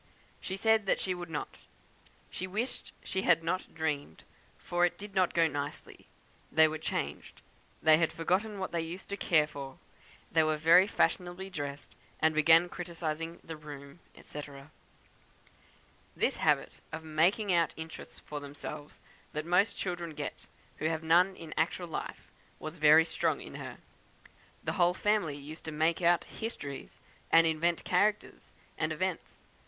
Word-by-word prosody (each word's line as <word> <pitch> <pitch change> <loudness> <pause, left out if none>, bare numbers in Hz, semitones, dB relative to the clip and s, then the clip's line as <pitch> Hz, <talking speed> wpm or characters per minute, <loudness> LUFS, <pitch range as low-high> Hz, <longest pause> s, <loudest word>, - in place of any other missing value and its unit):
She 190 - -5
said 220 -1 +3
she 185 - -1
would 175 -1 -7
not; 150 -2 -5 0.7
she 185 - -4
wished 215 +7 -3
she 190 - -2
had 165 -3 +4
not 185 +3 -2
dreamed, 150 - -3 0.3
for 175 0 -1
it 175 - +2
did 205 0 -9
not 185 -2 +2
go 165 -1 +5
on 160 - 0
nicely, 145 0 -6 0.4
they 160 0 +6
were 155 0 -4
changed; - - -4 0.4
they 155 0 +7
had 165 - +2
forgotten 195 +6 0
what 190 - -3
they 170 - 0
used 170 +3 -7
to 200 - -2
care 160 -6 +3
for. 140 -3 -8 0.5
They 160 - +5
were 155 -1 +2
very 170 +5 +6
fashionably 185 -2 0
dressed, 145 -4 -6 0.3
and 160 +1 +3
began 160 +3 +6
criticising 165 -2 -5
the 165 - -7
room, 145 0 -10 0.2
&c. 150 - -7 1.7
"This - - +1
habit - - +1
of 160 - -6
'making 175 +6 +2
out' 170 -2 +2
interests 160 0 -8
for 150 - -7
themselves 145 +1 -8 0.4
that 155 0 -3
most 195 +5 +3
children 175 -4 -4
get - - -6 0.3
who 155 - -4
have 160 0 0
none 180 +4 +4
in 165 -3 -8
actual 175 +2 0
life, - - -5 0.3
was 155 +2 -7
very 155 +1 +7
strong 165 - 0
in - - -10
her. - - -7 0.9
The - - -1
whole 175 +1 +4
family 195 -8 +1
used 150 +3 -9
to 160 - -3
'make 160 +3 +1
out' 175 0 +4
histories, 145 - -7 0.3
and 165 0 +7
invent 165 +1 +1
characters 205 +3 0 0.3
and - - 0
events. - - -3
165 Hz, 155 wpm, -31 LUFS, 155-180 Hz, 1.7 s, they